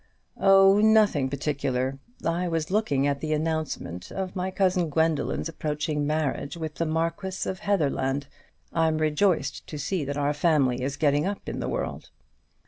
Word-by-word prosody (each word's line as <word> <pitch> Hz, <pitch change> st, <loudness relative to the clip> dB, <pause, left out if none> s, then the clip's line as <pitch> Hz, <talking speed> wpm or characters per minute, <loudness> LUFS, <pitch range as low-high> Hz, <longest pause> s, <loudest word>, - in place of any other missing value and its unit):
"Oh, 195 Hz, 0 st, +6 dB
nothing 215 Hz, -11 st, +4 dB
particular; 135 Hz, -2 st, -2 dB, 0.3 s
I 170 Hz, +2 st, 0 dB
was 165 Hz, -1 st, -2 dB
looking 165 Hz, -10 st, +1 dB
at 140 Hz, -1 st, 0 dB
the 155 Hz, -1 st, -1 dB
announcement 155 Hz, -, -3 dB
of 190 Hz, 0 st, -4 dB
my 185 Hz, 0 st, -1 dB
cousin 185 Hz, -3 st, +1 dB
Gwendoline's 160 Hz, +1 st, 0 dB
approaching 150 Hz, -2 st, -2 dB
marriage 150 Hz, -1 st, -1 dB
with 160 Hz, -2 st, -4 dB
the 165 Hz, +3 st, -2 dB
Marquis 165 Hz, +4 st, -2 dB
of 185 Hz, -, -3 dB
Heatherland. 140 Hz, -7 st, 0 dB, 0.5 s
I'm 160 Hz, -1 st, +2 dB
rejoiced 155 Hz, 0 st, +1 dB
to 150 Hz, -, -6 dB
see 165 Hz, +3 st, -2 dB
that 140 Hz, +1 st, -3 dB
our 145 Hz, 0 st, +1 dB
family 145 Hz, -5 st, +2 dB
is 135 Hz, +2 st, -2 dB
getting 145 Hz, +2 st, +2 dB
up 200 Hz, 0 st, -5 dB
in -, -, -4 dB
the -, -, -2 dB
world." -, -, -4 dB
155 Hz, 155 wpm, -26 LUFS, 145-180 Hz, 0.5 s, Oh